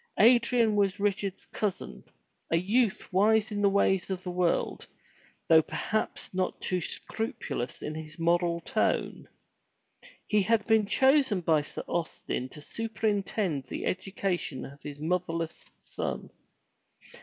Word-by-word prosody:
Adrian 235 -1 +5
was 200 -1 +2
Richard's 200 -1 -1
cousin, 205 -4 -4 0.5
a 165 - +3
youth 205 +3 +1
wise 220 +4 +4
in 205 -1 -2
the 200 - +5
ways 195 -1 +2
of 185 -1 -3
the 180 - -4
world, 180 -1 0 0.6
though 160 -1 +7
perhaps 215 +6 -3
not 185 0 -1
too 185 -1 -1
scrupulous 195 - -4
in 150 - -3
his 155 0 -8
moral 170 0 +1
tone. - - -1 1.0
He 210 -1 +3
had 220 +2 +2
been 220 -2 +3
chosen 265 -5 +4
by 160 -3 +3
Sir 145 - -6
Austin 160 -6 -3
to 150 - -11
superintend 205 - -1
the - - -4
education 185 -6 -2
of 140 +1 -12
his 145 -1 -8
motherless 165 0 -2
son. - - -5
190 Hz, 130 wpm, -29 LUFS, 165-215 Hz, 1.0 s, though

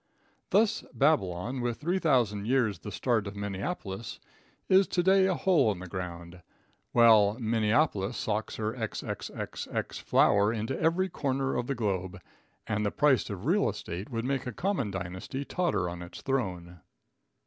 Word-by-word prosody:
Thus 210 +1 +3
Babylon, 125 - +1
with 120 -1 -2
3,000 130 - +1
years 120 -7 +1
the 105 - -7
start 115 -4 0
of 100 - -7
Minneapolis, 100 - -5 0.5
is 190 +1 +5
to 175 - 0
day 190 +1 +5
a 185 - +1
hole 155 - +3
in 100 - -4
the 90 - -8
ground, 85 -1 -7 0.5
while 110 -3 +6
Minneapolis 110 -1 +1
socks 110 0 -2
her 110 0 -2
XXXX 115 -4 -5
flour 100 +1 +4
into 115 +3 -3
every 175 +4 +2
corner 135 -5 -1
of 125 0 -2
the 140 - -1
globe, 95 -4 -2 0.5
and 105 -1 -1
the 105 - +1
price 140 0 +2
of 100 0 -6
real 195 +7 +3
estate 90 +5 -6
would 115 -2 -3
make 135 -1 -1
a 125 - -4
common 180 - -1
dynasty 95 +8 -5
totter 145 - 0
on 85 0 -6
its 85 +1 -10
throne. 90 - -3
110 Hz, 150 wpm, -29 LUFS, 100-140 Hz, 0.5 s, while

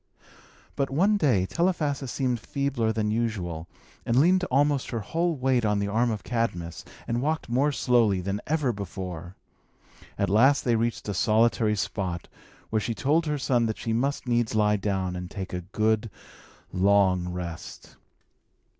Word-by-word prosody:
But, 140 -1 0
one 190 +10 +3
day, 130 - +2
Telephassa 150 - 0
seemed 125 -2 -1
feebler 135 -3 -1
than 105 -1 -1
usual, 95 -8 -2 0.4
and 120 +2 +2
leaned 180 +5 +4
almost 140 -1 +1
her 115 -3 -3
whole 165 +10 -1
weight 130 -2 +1
on 105 -1 +2
the 100 0 -1
arm 115 +4 +2
of 110 -2 -3
Cadmus, 90 -9 -2 0.2
and 120 +1 -1
walked 155 -1 -1
more 135 +5 +2
slowly 120 -8 +2
than 100 +3 -3
ever 150 -5 +1
before. 90 -3 -6 0.8
At 100 - +1
last 130 +8 +4
they 120 -2 +3
reached 115 0 -1
a 105 - -1
solitary 110 +2 +2
spot, 95 -3 -3 0.4
where 110 - +2
she 115 +1 -2
told 155 +7 +1
her 150 0 0
son 120 -4 +1
that 110 - -3
she 115 - -2
must 135 +5 -1
needs 120 -2 0
lie 105 -1 +3
down, 95 -2 -2
and 90 0 -6
take 95 -2 -6
a 90 - -2
good, 110 +4 0 0.6
long 95 -2 +3
rest. 85 -2 -7
115 Hz, 160 wpm, -26 LUFS, 100-135 Hz, 0.8 s, leaned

